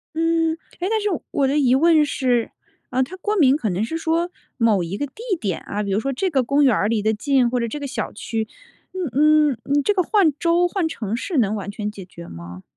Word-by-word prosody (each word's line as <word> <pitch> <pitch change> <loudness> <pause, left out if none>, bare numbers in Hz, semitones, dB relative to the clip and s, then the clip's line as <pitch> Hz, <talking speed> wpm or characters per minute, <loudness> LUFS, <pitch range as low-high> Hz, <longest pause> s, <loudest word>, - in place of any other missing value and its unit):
嗯。 330 0 +1 0.3
诶， 360 - -1
但 445 - +1
是， 420 - -1 0.2
我 275 - +1
的 280 +3 +1
疑 260 -3 +4
问 315 +1 +5
是， 250 -5 0 0.4
呃， 260 +1 +1
它 355 +8 -7
过 415 +3 -1
敏 275 -5 +5
可 225 -8 -2
能 185 +3 -1
是 280 +9 -3
说， 330 +2 0 0.3
某 220 -6 +3
一 175 +4 -4
个 285 - -2
地 270 - -27 0.3
点 195 -7 -2
啊， 210 +1 -4
比 200 - -3
如 195 - +2
说 275 +4 -2
这 375 +9 -1
个 270 -6 +1
公 280 +4 +2
园 255 -5 +4
儿 205 - +1
离 220 -2 0
得 220 +1 +1
近， 255 +2 +2
或 245 0 0
者 235 - -1
这 295 - -5
个 285 - -4
小 255 -5 -4
区， 220 +1 -3 0.5
嗯 305 -3 +3
嗯， 245 - -5
嗯 285 +1 +1
这 415 - +2
个 370 -3 +2
换 390 -7 +3
州、 345 +1 +3
换 355 -3 -1
城 225 -8 -4
市 315 +5 -3
能 215 -3 +2
完 200 -2 -5
全 210 0 -4
解 200 -3 -10
决 170 -1 -12
吗？ 85 +2 -10
265 Hz, 265 characters per minute, -22 LUFS, 215-325 Hz, 0.5 s, 问